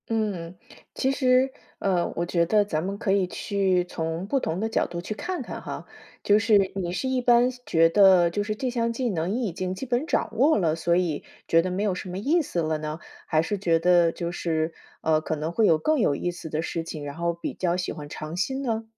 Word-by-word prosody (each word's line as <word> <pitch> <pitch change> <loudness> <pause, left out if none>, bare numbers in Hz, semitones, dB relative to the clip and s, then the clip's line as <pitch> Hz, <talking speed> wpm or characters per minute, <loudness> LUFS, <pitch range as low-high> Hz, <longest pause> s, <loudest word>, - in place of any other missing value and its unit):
嗯， 200 -6 -2 0.4
其 265 - +1
实， 260 -1 +3 0.3
呃， 180 -3 0
我 170 - -1
觉 170 -1 +1
得 205 +3 +3
咱 160 -6 -2
们 195 +2 -3
可 195 - -1
以 195 -2 +2
去 190 -2 0
从 165 0 -4
不 270 +6 +1
同 170 -8 -2
的 220 - 0
角 225 - +1
度 170 - -5
去 180 +5 -4
看 360 - -4
看 - - -7
哈。 - - -6 0.4
就 205 - +5
是 205 -3 +3
你 180 -3 -2
是 225 +8 -2
一 260 -1 0
般 245 0 +5 0.2
觉 165 0 +4
得 185 -1 +6
就 205 +4 -1
是 215 +1 -3
这 255 +4 -2
项 235 -1 0
技 245 +1 -1
能 170 -2 -1
你 245 +2 -1
已 190 - -3
经 185 +1 -3
基 265 - -5
本 250 +3 0
掌 225 - -1
握 280 +8 +4
了， 165 -6 +1
所 170 +1 +1
以 175 -5 0 0.2
觉 165 - +5
得 185 +2 -3
没 190 +3 -1
有 205 -3 +1
什 180 - -6
么 180 - -5
意 300 - +2
思 180 - -2
了 155 -1 0
呢？ 155 +1 -5 0.3
还 155 -1 +3
是 205 +5 -2
觉 170 -4 +2
得 175 -1 +4
就 170 0 -4
是， 165 -2 -1 0.3
呃， 155 -1 +2
可 155 - -2
能 155 +2 -3
会 220 +5 +2
有 160 - +5
更 310 - +1
有 145 -11 +2
意 175 - -2
思 175 -2 -8
的 155 +1 -1
事 165 0 -3
情， 155 -3 -7
然 145 0 -6
后 170 +1 -1
比 170 - -5
较 175 -1 0
喜 180 - -3
欢 145 -1 -9
尝 155 +2 -6
新 265 +9 -1
呢？ 225 -3 -1
180 Hz, 260 characters per minute, -25 LUFS, 165-220 Hz, 0.4 s, 得